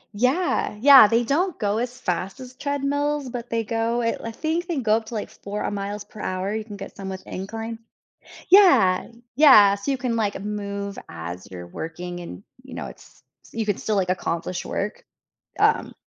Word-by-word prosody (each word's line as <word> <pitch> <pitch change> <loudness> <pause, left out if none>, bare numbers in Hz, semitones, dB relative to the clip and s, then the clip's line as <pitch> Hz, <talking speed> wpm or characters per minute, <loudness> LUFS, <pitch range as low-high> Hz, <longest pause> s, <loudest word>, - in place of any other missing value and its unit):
Yeah. 255 - +1
Yeah, 265 -2 +9
they 230 +3 +2
don't 325 +8 0
go 210 0 0
as 250 +1 -4
fast 185 0 -3
as 255 -1 -10
treadmills, 285 0 -1
but 240 -1 -6
they 230 0 0
go 230 +2 -1
at 230 - -1
l - - -9
I - - -4
think 325 +7 -2
they 340 -5 -2
go 220 -4 +3
up 225 -1 -7
to, 230 - -7
like, 210 - -4
4, 205 +1 -6
uh, - - -2
miles 205 +1 -4
per 210 - -12
hour, 185 +2 -2
you 220 - -2
can 210 -2 -9
get 195 - -9
some 195 -1 -6
with 190 0 -7
incline. 225 +4 -6 0.7
Yeah. 355 - +6 0.3
Yeah, 215 -9 +8
so 200 +7 -4
you 270 - 0
can, 245 -2 -1
like, 205 -3 -1
move 200 -1 -4
as 85 +3 -7
you're 90 -2 -8
working, 175 - -6
and, 175 +2 -9 0.2
you 265 - -13
know, - - -5
it's - - -14 0.2
s - - -18
you 225 -1 -2
could 205 -2 0
still, 215 -2 -1
like, 185 -2 +1
accomplish 180 0 -2
work, 205 +1 -4 0.6
um - - +2
215 Hz, 200 wpm, -23 LUFS, 195-255 Hz, 0.7 s, Yeah